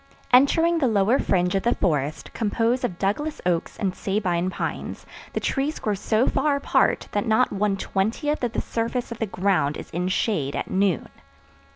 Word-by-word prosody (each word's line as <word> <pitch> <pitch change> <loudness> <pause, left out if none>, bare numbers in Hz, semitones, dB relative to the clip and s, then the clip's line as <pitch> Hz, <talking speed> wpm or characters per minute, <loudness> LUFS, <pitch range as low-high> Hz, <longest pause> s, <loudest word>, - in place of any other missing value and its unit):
Entering 325 +6 +5
the 275 - +2
lower 220 +4 +3
fringe 180 -1 +1
of 195 - +1
the 240 - +1
forest 150 -3 -1
composed 230 +3 0
of 185 -8 -2
Douglas 295 +12 -1
oaks 175 -2 -1
and 190 -3 -1
Sabine 185 -3 -1
pines, - - -5 0.3
the - - 0
trees 285 +3 -1
grow 210 - -1
so 215 +4 +1
far 295 -2 +1
apart 280 - +1
that 205 +3 -1
not 220 +3 +3
one 200 0 0
twentieth 225 +11 -1
of 235 -2 -1
the - - -1
surface 235 +2 -3
of 235 - -6
the 225 - -1
ground 180 -7 +1
is - - -9
in 180 +2 -1
shade 185 - 0
at - - -4
noon. 190 -2 +1
205 Hz, 180 wpm, -24 LUFS, 185-245 Hz, 0.3 s, Entering